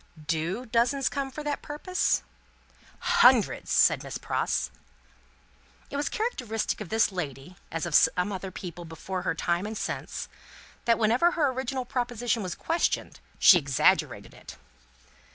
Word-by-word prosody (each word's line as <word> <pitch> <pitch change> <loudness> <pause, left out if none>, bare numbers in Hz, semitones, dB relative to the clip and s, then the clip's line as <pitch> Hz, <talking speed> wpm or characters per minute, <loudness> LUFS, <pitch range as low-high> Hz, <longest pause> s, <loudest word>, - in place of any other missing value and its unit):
"Do 170 +10 -2
dozens 245 +4 +1
come 275 -1 -3
for 300 +3 -7
that 295 -1 -2
purpose?" 300 - -1 1.0
"Hundreds," - - +5
said - - +4
Miss - - -6
Pross. - - -1 1.2
It - - -5
was 290 +1 -1
characteristic 250 - -2
of 200 - -6
this 220 -1 +2
lady 155 -2 -6 0.2
(as 165 0 -2
of 170 - -5
some 180 +6 +4
other 190 0 -5
people 175 -2 -8
before 170 +3 -5
her 175 -3 -1
time 175 +4 -1
and 220 0 -5
since) - - -4 0.6
that 230 -1 +4
whenever 240 +11 +3
her 295 -6 +2
original 260 0 -3
proposition 245 -2 -1
was 185 -3 -4
questioned, 335 +1 -1 0.2
she 180 - +8
exaggerated 140 -3 +1
it. - - -12
220 Hz, 140 wpm, -27 LUFS, 175-265 Hz, 1.2 s, she